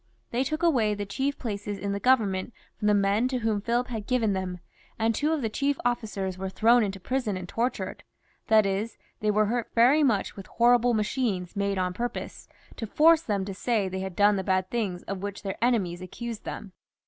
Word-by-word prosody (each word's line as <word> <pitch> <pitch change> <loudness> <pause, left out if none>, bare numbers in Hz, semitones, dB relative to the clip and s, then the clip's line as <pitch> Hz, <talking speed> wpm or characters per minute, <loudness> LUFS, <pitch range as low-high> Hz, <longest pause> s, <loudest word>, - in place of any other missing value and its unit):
They 245 +2 +1
took 310 +5 -3
away 235 -11 +3
the 205 0 -4
chief 270 +8 -2
places 205 -3 -4
in 200 +1 -3
the 200 - -2
Government 215 -5 +2 0.2
from 210 - -2
the 210 - +5
men 200 +4 +2
to 255 0 -1
whom 220 -3 0
Philip 240 +3 0
had 220 -4 -5
given 230 -5 +2
them, 185 -1 -3 0.4
and 225 0 +1
two 295 +7 0
of 310 -5 0
the - - +1
chief 280 +5 0
ofl&cers 210 -6 -2
were 190 0 -3
thrown 230 +5 +4
into 195 -2 -2
prison 235 -1 -2
and 180 -1 -7
tortured; 235 +6 -2 0.5
that 215 -1 +5
is, 200 +3 -2 0.2
they 215 - 0
were 210 +1 +3
hurt 235 +2 -1
very 250 +6 +5
much 230 -9 +1
with 195 - -9
horrible 240 0 +3
machines 210 -4 -1
made 200 -1 0
on 180 -1 0
purpose, 240 +5 -5 0.3
to 225 - -4
force 320 +7 +5
them 205 -9 -1
to 195 - -5
say 210 0 0
they 190 0 -4
had 190 -2 -5
done 205 0 +4
the 190 - -2
bad 185 0 0
things 200 -7 -2
of 195 -1 -5
which 200 0 -5
their 195 +2 -4
enemies 195 -8 +1
accused 230 +5 -7
them. 200 - -6
210 Hz, 210 wpm, -27 LUFS, 195-240 Hz, 0.5 s, the